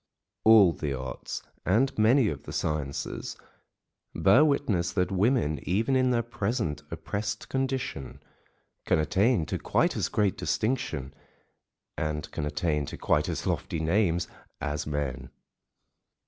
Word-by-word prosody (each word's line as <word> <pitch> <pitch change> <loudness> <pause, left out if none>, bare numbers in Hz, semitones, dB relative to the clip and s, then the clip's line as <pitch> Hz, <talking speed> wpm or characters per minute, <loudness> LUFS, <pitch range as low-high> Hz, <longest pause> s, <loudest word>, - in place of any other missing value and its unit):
All 110 -6 +8
the 70 -4 -3
arts, 65 0 -6 0.2
and 115 +9 +2
many 115 +3 +4
of 70 - -5
the - - -9
sciences, 75 -3 -3 0.8
bear 110 +10 +6
witness 140 - +1
that 90 -1 0
women, 95 - +2
even 110 +9 +1
in 130 -1 +3
their 120 -2 +2
present 115 - -2
oppressed 105 0 -4
condition, 130 - -3 0.7
can - - +4
attain 95 - +2
to - - -3
quite - - +1
as - - -1
great 105 -3 +1
distinction, 80 - -1 0.9
and 75 -1 -3
can 75 - -3
attain 75 -1 -1
to - - -6
quite - - +1
as - - -3
lofty 80 - -2
names 85 +1 +1 0.3
as 75 0 -3
men. 65 -4 -3
95 Hz, 130 wpm, -28 LUFS, 75-115 Hz, 0.9 s, All